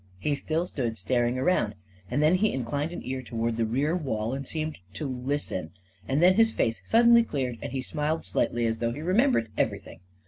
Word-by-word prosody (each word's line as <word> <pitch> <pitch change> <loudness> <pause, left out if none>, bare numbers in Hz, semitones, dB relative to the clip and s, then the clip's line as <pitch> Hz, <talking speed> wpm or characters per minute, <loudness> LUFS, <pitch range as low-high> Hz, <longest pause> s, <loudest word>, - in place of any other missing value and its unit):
He 145 +10 -1
still 160 +4 -1
stood 120 -9 -3
staring 120 +4 +1
around, 130 -7 +1 0.3
and 140 +5 +1
then 155 +3 +5
he 205 +3 +3
inclined 140 +5 -2
an 175 - -6
ear 130 0 -3
toward 115 -2 -2
the 115 -1 0
rear 140 +8 +1
wall 115 -8 -2
and 135 0 -4
seemed 155 -4 -3 0.2
to 125 - -4
listen; 125 - -3 0.3
and 140 +5 +1
then 180 +1 +7
his 225 +3 +4
face 115 - 0
suddenly 235 +1 +6
cleared, 130 - -3
and - - -5
he 130 0 -3
smiled 155 +3 -2
slightly, 120 0 0
as 115 0 -1
though 115 0 0
he 150 - -6
remembered 185 - +2
everything. - - -2
135 Hz, 200 wpm, -27 LUFS, 115-160 Hz, 0.3 s, then